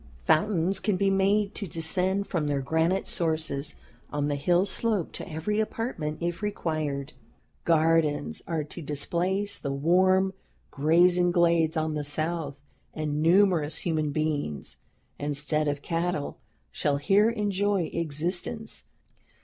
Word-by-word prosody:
Fountains 180 +2 +2
can 210 -4 0
be 195 +1 +2
made 200 +2 +2
to 200 - -5
descend 180 +5 0
from 165 -7 -2
their 140 -2 -1
granite 165 +6 +1
sources 155 -4 -1 0.4
on 145 0 -1
the 145 - 0
hill 175 +6 +2
slope 205 -2 -1
to 190 - -8
every 175 +8 -1
apartment 215 -9 -3
if 170 0 -2
required. 155 -8 -3 0.5
Gardens 160 - +2
are 160 -2 -1
to 150 +4 -8
displace 180 +7 -1
the 140 - -3
warm 185 +6 +3 0.4
grazing 175 +5 +4
glades 170 -2 +2
on 155 0 0
the 150 -1 -2
south, 150 -1 -2 0.4
and 150 -1 -2
numerous 170 -3 +3
human 160 -6 -1
beings, 145 - -2 0.4
instead 150 +1 +1
of 145 -1 -2
cattle, 165 -3 -2 0.3
shall 145 -1 0
here 200 +9 +3
enjoy 205 -4 0
existence. 175 +8 -2
165 Hz, 125 wpm, -27 LUFS, 150-190 Hz, 0.5 s, grazing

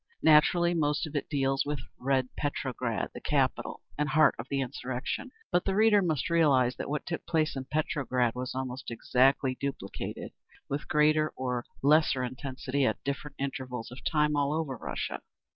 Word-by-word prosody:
Naturally 170 +3 +5
most 150 -2 +1
of 155 -1 -8
it 145 - -2
deals 135 -2 +1
with 145 0 -2 0.2
"Red 130 -1 +1
Petrograd," 130 -5 -2
the - - -8
capital - - 0 0.2
and 150 0 +1
heart 155 +2 +5
of 115 - -5
the 140 - 0
insurrection. 130 - -3 0.2
But 175 - +3
the 195 - 0
reader 215 -1 +5
must 155 -6 0
realize 140 -7 +3
that - - -4
what 150 0 -2
took 165 - -4
place 155 -3 +1
in 135 -1 -4
Petrograd 130 -5 0
was 125 0 -4
almost 130 0 -4
exactly 130 +3 +2
duplicated, 135 -8 -5 0.4
with 140 +2 -3
greater 155 0 +3
or 125 -2 -2 0.2
lesser 145 -2 +4
intensity, 130 +2 -3
at - - 0
different 140 +1 -4
intervals 130 -4 -4
of 125 - -10
time, 150 -1 +2
all 145 0 +1
over 155 -4 -2
Russia. - - -4
140 Hz, 165 wpm, -29 LUFS, 130-155 Hz, 0.4 s, Naturally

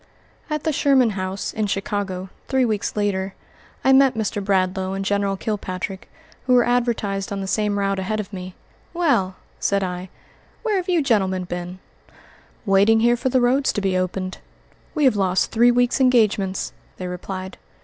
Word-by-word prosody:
At 305 -1 -2
the 315 - 0
Sherman 265 -5 +3
House, 190 0 -4
in 215 -1 -1
Chicago, 195 -2 -3 0.2
three 265 -2 +2
weeks 215 -3 -1
later, 195 -2 -1 0.5
I 265 - +5
met 265 -1 +5
Mr. 210 -2 -2
Bradlaugh 190 -1 0
and 195 0 -3
General 200 -1 0
Kilpatrick, 190 -2 -4 0.4
who 250 - +5
were 245 - +5
advertised 230 -6 0
on 200 - -2
the 195 - -3
same 205 +1 0
route 195 -1 0
ahead 215 +3 -2
of 205 0 -6
me. 185 -1 -7 0.4
"Well," 275 - +1 0.2
said 200 -1 +1
I, 180 0 -4 0.5
"where 435 -4 +1
have 370 0 -3
you 345 -4 +3
gentlemen 190 -7 +1
been?" 175 +1 -5 0.9
"Waiting 205 +3 +4
here 240 +1 +4
for 250 +2 -1
the 255 0 +2
roads 260 +3 +3
to - - -1
be 190 -1 0
opened. 185 +1 -2 0.6
We 305 - +1
have 260 -5 +5
lost 190 -2 +1
three 235 +2 +5
weeks' 245 +2 +2
engagements," 210 -7 +2 0.2
they 185 - -5
replied. 185 +1 -6
200 Hz, 170 wpm, -22 LUFS, 190-245 Hz, 0.9 s, I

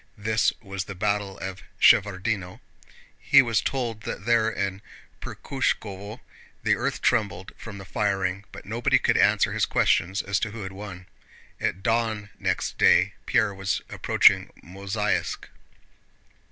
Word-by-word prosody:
(This 110 +1 +1
was 95 -2 -5
the 100 - -8
battle 100 0 -1
of 95 -1 -6 0.2
Shevárdino.) 95 -1 +3 0.6
He 140 -1 +6
was 115 -4 +1
told 120 -5 -3
that 100 - -6
there 115 -1 +3
in 100 -2 -3 0.4
Perkhúshkovo 105 -4 -3 0.4
the - - +3
earth - - -3
trembled 95 -2 0
from 110 -3 -9
the 95 - -9
firing, 100 -2 -1
but - - -11
nobody 115 +3 +2
could - - +1
answer - - +3
his - - +1
questions 95 +4 +1
as 100 0 0
to 110 - -2
who 110 0 -7
had 95 - -6
won. 95 -2 -9 0.5
At 95 - -2
dawn 110 -2 0
next - - -2
day - - +5
Pierre 100 -2 +2
was 95 0 -2
approaching - - +3
Mozháysk. 100 +3 -2
100 Hz, 140 wpm, -25 LUFS, 95-110 Hz, 0.6 s, He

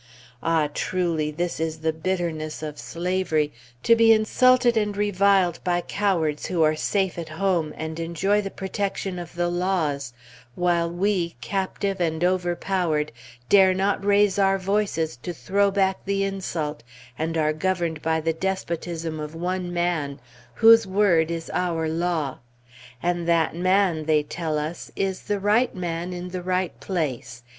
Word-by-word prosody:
Ah, 160 -2 +2
truly! 170 -4 -1
this 165 -1 -3
is 160 0 -2
the 160 0 0
bitterness 160 -3 -3
of 150 -1 -6
slavery, 170 -4 -1 0.3
to 230 - +6
be 230 0 +6
insulted 245 +3 +4
and 210 -2 0
reviled 200 -3 +3
by 175 -1 +1
cowards 175 -6 -1
who 170 -3 +1
are 155 0 +3
safe 190 +2 -1
at 165 - -6
home 165 -1 0
and 160 +1 -5
enjoy 180 +5 +1
the 195 - -4
protection 195 -1 -3
of 170 -1 -9
the 175 0 0
laws, 175 -7 -1 0.4
while 175 -1 +1
we, 175 -1 0
captive 195 +4 -2
and 160 -1 0
overpowered, 175 -3 0 0.4
dare 190 -2 +6
not 195 +1 0
raise 205 0 +3
our 195 0 +4
voices 185 -7 -1
to 175 +8 -6
throw 200 +4 +1
back 195 -1 0
the 195 0 0
insult, 170 -6 -3 0.3
and 165 +4 -2
are 155 -1 +2
governed 170 -1 -1
by 160 0 +1
the 165 +1 0
despotism 170 -3 -3
of 150 +1 -6
one 180 +1 -2
man, 170 -5 -1 0.4
whose 225 - +7
word 185 -5 +3
is 165 -1 -4
our 165 -3 0
law! 160 -4 -1 0.6
And 175 -1 0
that 165 -1 +2
man, 185 -2 +2
they 155 -1 +3
tell 155 0 -3
us, 155 +3 -5
"is 190 -1 -1
the 205 -1 -2
right 215 +5 +2
man 175 -1 -3
in 180 0 -5
the 180 0 -4
right 185 0 -1
place. 135 -9 -3
175 Hz, 150 wpm, -24 LUFS, 160-195 Hz, 0.6 s, whose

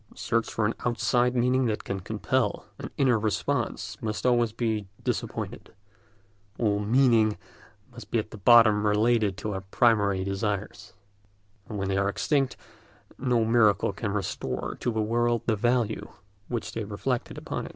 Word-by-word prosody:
The - - -20
search 115 -1 -1
for 110 - 0
an 110 - +1
outside 120 +1 +1
meaning 125 +1 +2
that 110 -2 -2
can 100 - -3
compel 110 +4 -1
an - - -6
inner 125 -5 +3
response 105 -1 -2
must 110 +1 -3
always 120 -2 +3
be 110 -3 -2 0.2
disappointed: - - -4 0.8
all 105 -3 +1
"meaning" 110 -1 +3 0.5
must 120 0 -11
be 120 - 0
at 110 -2 -5
bottom 110 -3 +6
related 105 -2 +2
to 105 -1 -4
our 95 - -4
primary 100 -1 +2
desires, 100 +1 -3 0.8
and 105 - -5
when 95 -1 -2
they 95 0 0
are 100 0 +1
extinct 135 +4 0 0.6
no 120 -3 +2
miracle 110 -4 +3
can 100 +1 -3
restore 100 -3 -3
to 120 - -1
the 110 -1 0
world 120 +1 +1
the 110 - +2
value 120 0 0 0.4
which 120 -3 -4
they 110 - -4
reflected 115 +5 -3
upon - - -5
it. - - -9
110 Hz, 155 wpm, -27 LUFS, 105-120 Hz, 0.8 s, bottom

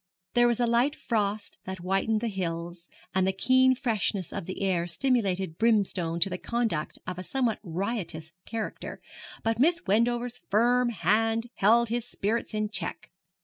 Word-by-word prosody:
There 240 0 +5
was 235 -1 +1
a 240 - +3
light 240 +5 +2
frost 210 -4 -2
that 190 0 -5
whitened 195 +4 0
the 235 - -1
hills, 170 -3 -4 0.2
and 190 0 +2
the - - +3
keen 260 +6 +4
freshness 215 - -1
of - - -5
the 190 +1 -4
air 175 -3 +1
stimulated 190 -5 0
Brimstone 195 -7 +2
to 180 +1 +2
conduct 225 -10 -1
of 180 0 -5
a - - -5
somewhat 245 0 0
riotous 175 -3 -3 0.2
character, 225 -1 -5 0.4
but 225 0 0
Miss 335 +6 +3
Wendover's 235 +4 +1
firm 240 +4 +3
hand 225 +4 +1
held 230 +3 +4
his 235 0 -1
spirits 220 +2 -2
in 215 0 0
check. 215 - -4
215 Hz, 155 wpm, -28 LUFS, 185-235 Hz, 0.4 s, There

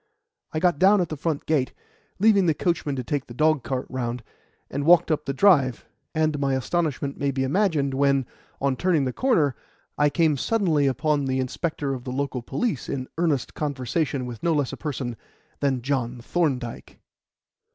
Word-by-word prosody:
I - - -3
got 175 -2 +2
down 195 +3 +6
at 175 - 0
the 155 - -3
front 155 0 -2
gate, 145 -5 +1 0.4
leaving 200 -2 +4
the 160 - +3
coachman 160 -5 -1
to 130 - -3
take 140 +3 -2
the 120 - -10
dogcart 140 -3 +1
round, 125 -2 -3 0.4
and 140 +1 -3
walked 170 +1 +5
up 150 -1 0
the 135 - -1
drive; 140 - +3 0.3
and 155 -2 +1
my 135 -1 +1
astonishment 140 0 -1
may 140 - +1
be 135 -1 -1
imagined 145 -2 +1
when, 140 -1 +2 0.3
on 135 -1 +1
turning 170 -5 +2
the 130 - -2
corner, 165 - +2 0.4
I 145 0 +5
came 155 -1 +2
suddenly 165 - +2
upon 145 +1 +1
the 130 0 0
inspector 140 +2 -2
of 125 -2 -6
the 125 - -5
local 135 -1 -2
police 195 - -2
in 130 -1 -3
earnest 155 -7 0
conversation 140 -1 -2
with 120 -3 -7
no 170 - +2
less 145 -3 0
a - - -3
person 130 -6 -4 0.4
than 135 -4 0
John 125 -3 -1
Thorndyke. 130 -3 -2
140 Hz, 175 wpm, -25 LUFS, 130-160 Hz, 0.4 s, down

